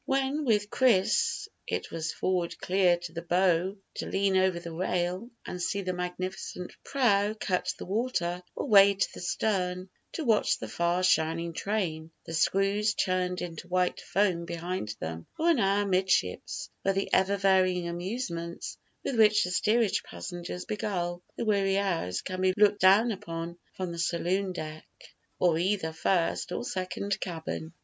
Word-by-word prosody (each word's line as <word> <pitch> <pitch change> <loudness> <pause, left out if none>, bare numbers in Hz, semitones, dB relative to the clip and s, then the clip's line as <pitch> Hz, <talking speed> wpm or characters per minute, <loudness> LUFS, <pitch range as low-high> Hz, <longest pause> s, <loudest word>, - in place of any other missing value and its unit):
When 270 +2 0
with 210 -4 +2
Chris 220 -5 +2 0.2
it - - -3
was 165 0 -2
forward 180 -2 -1
clear 180 -2 +3
to 175 -1 -8
the 170 - -4
bow 180 +2 +2 0.2
to - - -3
lean 195 0 +1
over 185 -2 +3
the 170 -1 -8
rail 180 +4 -1 0.2
and 180 - -5
see 200 +3 -1
the 185 0 -2
magnificent 180 0 -5
prow 215 -6 +2
cut 185 -4 -1
the - - -7
water; 185 -4 -1
or - - -3
way 200 -1 +7
to 195 - +1
the - - -8
stern, 185 -1 -1 0.2
to 325 - -3
watch 225 -3 +3
the 110 - -6
far 170 +9 0
shining 165 -1 +2
train, 165 -5 -2 0.2
the 165 - -7
screws 195 +5 +2
churned 185 -1 0
into 175 0 -7
white 180 0 +1
foam 185 -4 +1
behind 170 - -4
them; 80 +1 -5
or 335 +2 +3
an 305 - +2
hour 200 0 +2
'midships, 185 - 0
where 195 0 +1
the 195 - -2
ever 195 +2 +3
varying 185 -2 +3
amusements 170 -1 -4 0.2
with 270 - -2
which 215 -1 +6
the 180 - -2
steerage 220 +2 +2
passengers 180 0 -7
beguile 175 -4 -2 0.2
the - - -2
weary 195 -2 +2
hours 170 - -1
can 185 0 -4
be 185 0 +3
looked 205 0 +5
down 200 +5 +6
upon 170 -3 -5 0.2
from 185 -2 -3
the 170 - -6
saloon 180 +3 0
deck 155 -3 -7 0.5
of 170 -3 +3
either 180 -3 0
first 170 +1 0
or - - -2
second 185 +2 -3
cabin. 160 -2 -5
185 Hz, 160 wpm, -29 LUFS, 175-200 Hz, 0.5 s, way